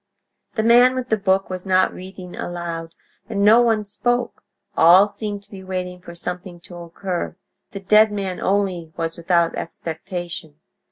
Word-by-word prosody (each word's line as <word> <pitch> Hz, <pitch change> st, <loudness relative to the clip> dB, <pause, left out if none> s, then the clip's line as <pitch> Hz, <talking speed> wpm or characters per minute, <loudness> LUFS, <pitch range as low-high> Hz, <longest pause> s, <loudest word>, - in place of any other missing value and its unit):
The 220 Hz, -, 0 dB
man 245 Hz, +3 st, +6 dB
with 255 Hz, -1 st, -3 dB
the 220 Hz, -, +3 dB
book 195 Hz, -2 st, +1 dB
was 185 Hz, -1 st, -5 dB
not 185 Hz, -1 st, +2 dB
reading 185 Hz, -1 st, -9 dB
aloud, 170 Hz, -1 st, -5 dB, 0.3 s
and 200 Hz, -3 st, 0 dB
no 225 Hz, +3 st, +7 dB
one 225 Hz, -3 st, +2 dB
spoke; 245 Hz, +4 st, -1 dB, 0.3 s
all 180 Hz, +5 st, +7 dB
seemed 205 Hz, -1 st, -6 dB
to -, -, -32 dB
be 190 Hz, -2 st, -9 dB
waiting 180 Hz, -1 st, -5 dB
for 170 Hz, -1 st, -11 dB
something 180 Hz, 0 st, -6 dB
to 175 Hz, -, -12 dB
occur; 175 Hz, +1 st, -4 dB, 0.3 s
the 195 Hz, -4 st, -8 dB
dead 210 Hz, +2 st, +5 dB
man 195 Hz, -3 st, -3 dB
only 185 Hz, -4 st, 0 dB
was 165 Hz, 0 st, -2 dB
without 170 Hz, -1 st, +1 dB
expectation. 170 Hz, -1 st, -6 dB
185 Hz, 160 wpm, -21 LUFS, 175-205 Hz, 0.3 s, no